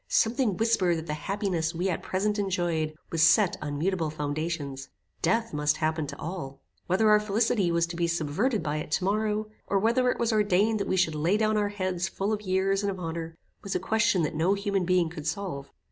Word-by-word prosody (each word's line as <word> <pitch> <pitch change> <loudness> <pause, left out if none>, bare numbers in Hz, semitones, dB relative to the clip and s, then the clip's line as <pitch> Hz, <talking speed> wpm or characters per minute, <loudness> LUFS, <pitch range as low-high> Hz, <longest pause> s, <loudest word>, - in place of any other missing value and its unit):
Something 225 -4 +2
whispered 195 -7 +2
that 160 - -5
the 150 - -3
happiness 175 -1 -2
we 180 +3 0
at 180 - -1
present 205 +3 -1
enjoyed 170 -5 -1 0.2
was 165 - 0
set 170 +4 +5
on 145 -1 -3
mutable 170 0 0
foundations. 145 -2 -4 0.3
Death 230 -3 +1
must 150 0 +1
happen 155 -1 -1
to 140 0 -7
all. 150 -5 -6 0.3
Whether 190 +5 +3
our 210 - +6
felicity 210 -3 +1
was 170 0 +2
to 170 0 -7
be 170 0 0
subverted 170 - 0
by 150 -1 -1
it 150 - -5
to - - +1
morrow, 215 +2 0 0.2
or 200 - +1
whether 235 +5 +2
it - - 0
was 235 -1 +1
ordained 210 +1 +2
that 200 - -2
we 190 - 0
should 175 -3 +2
lay 165 +7 +1
down 215 0 +1
our 205 -1 +1
heads 185 -3 -2
full 200 +3 -2
of 210 - -2
years 195 0 +1
and 200 - 0
of 190 -1 -4
honor, 165 -1 -5 0.2
was 200 - -4
a - - +2
question 220 -1 +2
that 155 - -1
no 170 +6 +2
human 200 -2 -1
being 180 -1 +3
could 160 -2 -7
solve. 155 -5 -4
185 Hz, 215 wpm, -27 LUFS, 160-205 Hz, 0.3 s, our